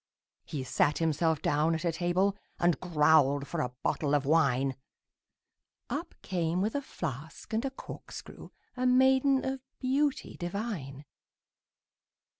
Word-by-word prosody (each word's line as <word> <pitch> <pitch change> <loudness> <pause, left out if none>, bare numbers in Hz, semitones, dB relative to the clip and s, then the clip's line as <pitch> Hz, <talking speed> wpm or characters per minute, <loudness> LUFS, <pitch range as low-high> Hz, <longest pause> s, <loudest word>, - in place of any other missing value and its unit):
He 140 -3 -4
sat 145 +3 +2
himself 160 -1 +1
down 155 +3 +2
at 160 +2 -4
a 170 - +2
table, 180 +4 +1 0.2
And 175 -1 +2
growled 150 -4 +4
for 170 - -2
a 125 - -1
bottle 145 -1 +1
of 145 -1 +1
wine; 135 -3 +3 1.2
Up 325 +5 -4
came 175 -2 -1
with 210 +4 0
a 285 - -1
flask 160 - -6
and 220 - +1
a - - 0
corkscrew 265 - -10 0.3
A 255 0 +1
maiden 265 +1 +4
of 265 0 -2 0.2
beauty 275 +2 0
divine. 175 - -4
170 Hz, 130 wpm, -30 LUFS, 150-250 Hz, 1.2 s, growled